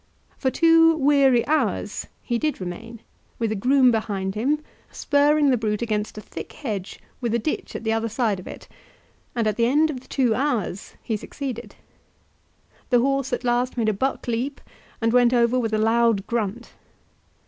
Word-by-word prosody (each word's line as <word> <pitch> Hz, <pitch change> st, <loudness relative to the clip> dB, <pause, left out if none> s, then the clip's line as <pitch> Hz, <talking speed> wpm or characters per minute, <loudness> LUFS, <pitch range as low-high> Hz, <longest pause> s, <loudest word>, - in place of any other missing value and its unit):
For 265 Hz, -, +1 dB
two 330 Hz, +2 st, +5 dB
weary 275 Hz, -4 st, +4 dB
hours 235 Hz, -, -1 dB, 0.2 s
he 235 Hz, -1 st, -1 dB
did 305 Hz, +2 st, -1 dB
remain, 220 Hz, +6 st, -7 dB, 0.4 s
with 225 Hz, -2 st, -1 dB
a -, -, -1 dB
groom 255 Hz, +4 st, +4 dB
behind 200 Hz, -4 st, -2 dB
him, 265 Hz, +8 st, 0 dB, 0.3 s
spurring 290 Hz, 0 st, +3 dB
the 250 Hz, -, +3 dB
brute 215 Hz, 0 st, -1 dB
against 215 Hz, -2 st, -2 dB
a -, -, -5 dB
thick -, -, -9 dB
hedge, 205 Hz, -8 st, -5 dB, 0.2 s
with 235 Hz, -2 st, 0 dB
a -, -, +4 dB
ditch 235 Hz, +7 st, -3 dB
at -, -, -5 dB
the 220 Hz, 0 st, +1 dB
other 225 Hz, 0 st, -1 dB
side 220 Hz, -4 st, 0 dB
of 185 Hz, -, -11 dB
it, -, -, -10 dB, 0.7 s
and 230 Hz, -2 st, 0 dB
at 215 Hz, -1 st, 0 dB
the 235 Hz, 0 st, +3 dB
end 305 Hz, +5 st, +3 dB
of 265 Hz, -, -6 dB
the 250 Hz, -, -20 dB
two 250 Hz, -5 st, +1 dB
hours 240 Hz, -8 st, -2 dB
he 225 Hz, -, -2 dB
succeeded. 255 Hz, +3 st, -6 dB, 1.1 s
The 245 Hz, -, +4 dB
horse 275 Hz, +1 st, 0 dB
at 245 Hz, -, -2 dB
last 245 Hz, +1 st, 0 dB
made 225 Hz, -2 st, +2 dB
a -, -, +1 dB
buck 265 Hz, +7 st, -2 dB
leap 245 Hz, +4 st, -2 dB, 0.4 s
and 225 Hz, +1 st, +1 dB
went 245 Hz, 0 st, +5 dB
over 240 Hz, +1 st, +3 dB
with 225 Hz, -3 st, -1 dB
a 215 Hz, -, +1 dB
loud 225 Hz, -2 st, +2 dB
grunt. 235 Hz, 0 st, -3 dB
235 Hz, 180 wpm, -23 LUFS, 220-270 Hz, 1.1 s, two